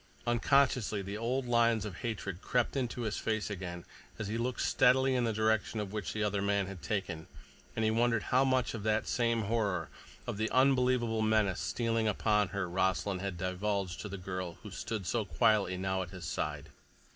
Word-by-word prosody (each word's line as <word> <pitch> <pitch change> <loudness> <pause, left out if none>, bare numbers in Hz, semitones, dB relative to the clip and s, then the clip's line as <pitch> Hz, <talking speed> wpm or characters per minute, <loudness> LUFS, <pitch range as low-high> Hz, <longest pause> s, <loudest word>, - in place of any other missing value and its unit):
Unconsciously 120 -3 +2
the 100 +2 -5
old 125 +4 -1
lines 115 -2 +3
of 95 -4 -6
hatred 100 -6 -4
crept 125 +1 0
into 125 -2 -2
his 110 -2 -2
face 110 -1 -1
again 90 -3 -6 0.3
as 100 - -4
he 110 - -2
looked 120 +2 -1
steadily 130 +1 +4
in 125 -2 +2
the 115 - +1
direction 110 0 +1
which 105 -1 -3
the 110 - -2
other 105 -1 0
man 100 0 +1
had 95 -2 -8
taken, 85 0 -3 0.5
and 110 - +1
he 110 - +3
wondered 115 0 +2
how 130 +2 +3
much 130 -2 +1
of 115 - -4
that 110 +1 +1
same 115 -2 +1
horror—of 100 -5 -3
the 110 +1 0
unbelievable 125 -3 +3
menace 110 -4 +2
stealing 115 -2 0
upon 105 0 +2
her—Rossland 95 0 -1
had 100 -3 -3
divulged 95 +1 -2
to 105 - -6
the 100 - -5
girl 90 -2 -5
who - - -8
stood 110 -4 -4
so 115 +5 0
quietly 95 +2 +2
now 95 0 -1
at 90 - -5
his 90 -1 -8
side. - - -3
110 Hz, 180 wpm, -32 LUFS, 95-115 Hz, 0.5 s, steadily